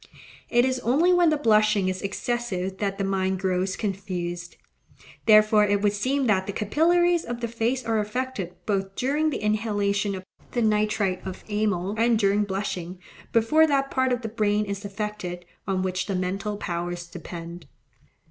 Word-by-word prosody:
It 240 +1 +4
is 260 -1 0
only 300 +11 +3
when 350 -2 +5
the 310 - +2
blushing 215 -6 +3
is 185 0 -2
excessive 195 -3 -3
that 195 -1 -1
the 195 - -1
mind 190 -1 0
grows 185 0 0
confused. 180 -4 -4 0.7
Therefore 215 -1 +6
it 205 0 +1
would 205 -1 +3
seem 260 +6 0
that 190 -4 +2
the 200 - -3
capillaries 340 - +2
of 240 0 -5
the 235 - -2
face 235 +3 -1
are 225 -1 +1
affected, 210 -4 -3
both 195 -2 -1
during 295 +5 +1
the 300 - -2
inhalation 205 -2 0
of 185 - -7 0.3
the 240 - +1
nitrite 210 -3 +1
of 190 -1 -7
amyl 205 -3 0
and 230 0 +4
during 205 0 +2
blushing, 190 -2 -4 0.3
before 305 +8 +4
that 275 -2 +1
part 260 0 +1
of 245 -1 -1
the - - -2
brain 210 -1 +1
is 200 0 -5
affected 200 -4 -5 0.2
on 190 -1 0
which 185 -1 -2
the 195 - -1
mental 195 +3 -2
powers 175 -2 -4
depend. 170 -1 -9
205 Hz, 165 wpm, -25 LUFS, 190-235 Hz, 0.7 s, Therefore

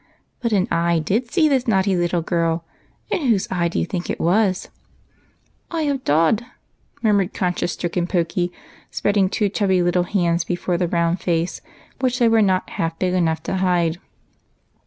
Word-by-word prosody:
" - - -45
But 235 -2 -1
an 195 -3 +2
eye 170 0 +2
did 220 +10 -1
see 320 -3 +4
this 265 -4 +1
naughty 190 -3 +2
little 175 -1 0
girl, 165 -1 0 0.5
and - - 0
whose 205 -5 +2
eye 175 -2 +1
do 170 - -4
you - - +1
think 175 0 -4
it - - -2
was? 185 +2 +1 0.3
" - - -38
" - - -41
Eye 330 -2 -1
of 280 -3 -1
Dod," 165 +9 +2 0.6
murmured 205 -4 +2
conscience 180 -2 -1
stricken 175 0 -2
Pokey, 175 0 0 0.4
spreading 200 -2 +1
two 210 +1 +1
chubby 190 -3 +1
little 175 +1 +2
hands 170 -4 +1
before 175 0 -2
the 180 - +1
round 170 +1 0
face, 170 0 -1 0.4
which 255 -1 0
they 240 -2 +4
were 225 -1 +4
not 190 -2 +2
half 165 0 -2
big 180 -1 0
enough 165 -3 0
to 190 - -2
hide. 175 -3 +1
180 Hz, 180 wpm, -21 LUFS, 170-205 Hz, 0.6 s, see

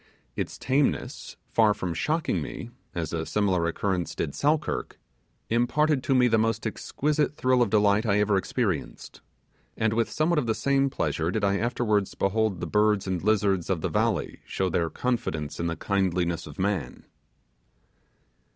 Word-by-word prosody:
Its - - -4
tameness, 135 +2 -1
far 110 -2 +4
from 90 -2 -3
shocking 155 - 0
me, 120 -1 -7 0.2
as 80 -3 -3
a 80 -1 -1
similar 95 -2 +1
occurrence 90 0 -2
did - - -2
Selkirk, 150 +1 -1 0.5
imparted 135 +5 +2
to 135 - +1
me 125 -1 +5
the 115 -2 +3
most 115 0 0
exquisite 150 +6 -1
thrill 130 -3 +2
of 120 - +3
delight 105 0 +3
I 105 -3 +2
ever 105 -1 +2
experienced, 95 - -2 0.6
and 110 -1 +1
with 115 0 +1
somewhat 155 +1 +1
of 125 - -2
the 110 - +1
same 140 0 +2
pleasure 80 -9 -1
did 105 +3 -2
I 100 0 +2
afterwards 105 -3 0
behold 100 -2 0
the - - -2
birds 105 -1 +2
and 95 -3 -2
lizards 100 -4 +1
of 90 -4 0
the - - -1
valley - - 0
show 95 -1 -1
their 85 -1 0
confidence 115 -13 -2
in 85 - -1
the 85 - -2
kindliness 90 -2 0
of - - -11
man. 95 -9 -2
105 Hz, 160 wpm, -26 LUFS, 95-125 Hz, 0.6 s, me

